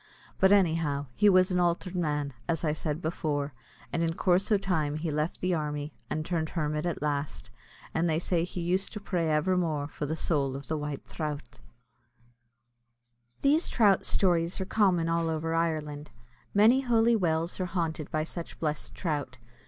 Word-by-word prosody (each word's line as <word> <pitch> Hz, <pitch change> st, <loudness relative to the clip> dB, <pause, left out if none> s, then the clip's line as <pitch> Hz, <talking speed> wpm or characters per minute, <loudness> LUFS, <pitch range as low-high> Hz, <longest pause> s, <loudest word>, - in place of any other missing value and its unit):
But 190 Hz, 0 st, +5 dB
anyhow, 160 Hz, -7 st, +2 dB
he 210 Hz, -, +4 dB
was 185 Hz, 0 st, +5 dB
an 180 Hz, -, +2 dB
altered 175 Hz, +1 st, 0 dB
man, 150 Hz, -5 st, -1 dB, 0.2 s
as 165 Hz, -1 st, 0 dB
I 155 Hz, -2 st, +1 dB
said 155 Hz, +1 st, -3 dB
before, 150 Hz, -3 st, -2 dB, 0.4 s
and 170 Hz, -, 0 dB
in 165 Hz, 0 st, 0 dB
coorse 185 Hz, +3 st, +2 dB
o' 210 Hz, -, +6 dB
time 165 Hz, -7 st, 0 dB
he 155 Hz, +1 st, -2 dB
left 150 Hz, +3 st, -2 dB
the 185 Hz, 0 st, +1 dB
army, 150 Hz, -2 st, -3 dB, 0.2 s
and 155 Hz, 0 st, -2 dB
turned 160 Hz, -2 st, -1 dB
hermit 150 Hz, 0 st, -1 dB
at 165 Hz, -4 st, -3 dB
last; 145 Hz, -1 st, -3 dB, 0.4 s
and 165 Hz, +1 st, +1 dB
they 155 Hz, -, +2 dB
say 170 Hz, 0 st, 0 dB
he 180 Hz, 0 st, -4 dB
used 180 Hz, +3 st, 0 dB
to 210 Hz, -, -4 dB
pray 175 Hz, -5 st, -1 dB
evermore 155 Hz, -2 st, +1 dB
for 150 Hz, 0 st, -5 dB
the 160 Hz, -, -1 dB
soul 140 Hz, -5 st, 0 dB
of 140 Hz, -, -7 dB
the 160 Hz, -, -1 dB
White 150 Hz, -2 st, -4 dB
Throut. 150 Hz, -3 st, -5 dB, 1.8 s
[These 300 Hz, +4 st, +3 dB
trout 205 Hz, -5 st, +4 dB
stories 175 Hz, -2 st, +2 dB
are 190 Hz, -, -2 dB
common 185 Hz, -5 st, +2 dB
all 165 Hz, 0 st, +1 dB
over 160 Hz, 0 st, -1 dB
Ireland. 155 Hz, -3 st, -1 dB, 0.4 s
Many 225 Hz, +6 st, +5 dB
holy 235 Hz, -2 st, +3 dB
wells 170 Hz, -3 st, 0 dB
are 185 Hz, -, -1 dB
haunted 165 Hz, -4 st, -2 dB
by 155 Hz, 0 st, 0 dB
such 165 Hz, +1 st, -7 dB
blessed 150 Hz, -2 st, -3 dB
trout. 145 Hz, -7 st, -3 dB
165 Hz, 175 wpm, -29 LUFS, 150-180 Hz, 1.8 s, o